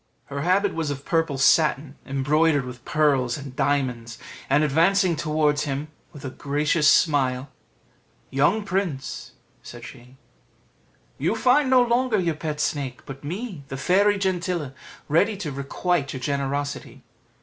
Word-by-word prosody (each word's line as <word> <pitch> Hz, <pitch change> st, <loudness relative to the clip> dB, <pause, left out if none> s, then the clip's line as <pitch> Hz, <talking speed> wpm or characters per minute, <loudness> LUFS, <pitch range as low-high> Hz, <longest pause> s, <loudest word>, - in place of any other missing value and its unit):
Her 140 Hz, -, -3 dB
habit 190 Hz, +4 st, +2 dB
was 160 Hz, -2 st, -2 dB
of 140 Hz, -1 st, -5 dB
purple 165 Hz, -4 st, 0 dB
satin, 145 Hz, 0 st, +3 dB
embroidered 145 Hz, +1 st, +2 dB
with 125 Hz, -1 st, -9 dB
pearls 140 Hz, -5 st, +1 dB
and 140 Hz, -3 st, -9 dB
diamonds; 130 Hz, -5 st, -1 dB, 0.3 s
and 145 Hz, +3 st, +3 dB
advancing 170 Hz, +5 st, +3 dB
towards 150 Hz, -1 st, 0 dB
him 145 Hz, +2 st, -3 dB, 0.2 s
with 145 Hz, -1 st, -11 dB
a 130 Hz, -, -4 dB
gracious 150 Hz, +3 st, 0 dB
smile 135 Hz, -4 st, +3 dB, 0.8 s
"Young 150 Hz, +11 st, +2 dB
prince," 175 Hz, -9 st, -3 dB, 0.3 s
said -, -, -10 dB
she, 125 Hz, +2 st, -13 dB, 1.0 s
"you -, -, 0 dB
find 260 Hz, +2 st, +3 dB
no 255 Hz, -1 st, +6 dB
longer 240 Hz, -2 st, +1 dB
your 170 Hz, -3 st, 0 dB
pet 150 Hz, -1 st, -5 dB
snake, 140 Hz, -4 st, -3 dB
but 135 Hz, 0 st, -9 dB
me, 180 Hz, +1 st, -5 dB
the 135 Hz, -, -6 dB
Fairy 200 Hz, +7 st, +3 dB
Gentilla, 180 Hz, -6 st, -2 dB, 0.3 s
ready 195 Hz, +8 st, +2 dB
to 175 Hz, -7 st, -4 dB
requite 140 Hz, +2 st, -2 dB
your 130 Hz, -, -5 dB
generosity. 140 Hz, +1 st, -3 dB
150 Hz, 140 wpm, -24 LUFS, 135-180 Hz, 1.0 s, no